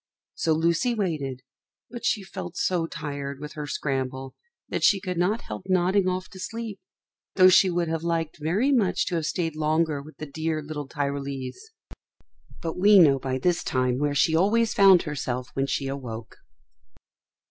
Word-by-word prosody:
So 160 - +1
Lucy 170 +10 +1
waited, 150 - -2 0.5
but 240 -1 -8
she 205 - +1
felt 175 -2 -7
so 175 -3 0
tired 140 -3 -5
with 150 +1 -7
her 150 -1 -6
scramble 130 -2 -3 0.3
that - - -3
she 200 - +5
could 185 -2 -4
not 205 +6 +1
help 105 - -8
nodding 185 +1 +2
off 185 0 -2
to 190 - -12
sleep, 225 0 -5 0.6
though 185 -1 +7
she 185 +1 +6
would 175 -1 0
have 165 0 -2
liked 165 -1 -2
very 195 - +1
much 220 -9 +2
to 180 - -2
have 160 -2 -2
stayed 165 -4 -2
longer 155 -1 0
with 155 +3 -14
the 155 - -6
dear 155 +2 -2
little 150 -1 -6
Tyrolese. 140 - -4 0.9
But 165 +1 -4
we 205 +2 +7
know 145 -7 +6
by 130 0 -2
this 175 +5 0
time 125 -1 0
where 145 0 0
she 160 +3 +3
always 220 +6 +3
found 195 -3 +6
herself 130 -4 -4
when 135 0 -1
she 135 - -1
awoke. 120 -5 -6
160 Hz, 170 wpm, -25 LUFS, 140-185 Hz, 0.9 s, though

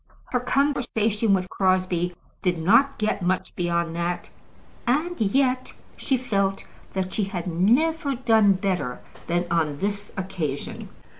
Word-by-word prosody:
Her 250 - +2
conversation 235 -5 +1
with 185 -1 -2
Crosbie 185 -2 +1 0.3
did 180 -2 +1
not 230 +12 +4
get 215 -2 0
much 185 +1 -1
beyond 170 -1 -1
that, 170 +1 -2 0.6
and 310 +5 0
yet 255 +4 +1 0.2
she 265 - 0
felt 195 -6 -1 0.3
that 190 -1 -2
she 210 - 0
had 185 -3 -4
never 270 - +2
done 225 -5 +4
better 185 -9 -2 0.3
than 175 +1 +1
on 155 -4 +1
this 205 +3 -3
occasion. 165 -7 -4
195 Hz, 130 wpm, -25 LUFS, 175-245 Hz, 0.6 s, not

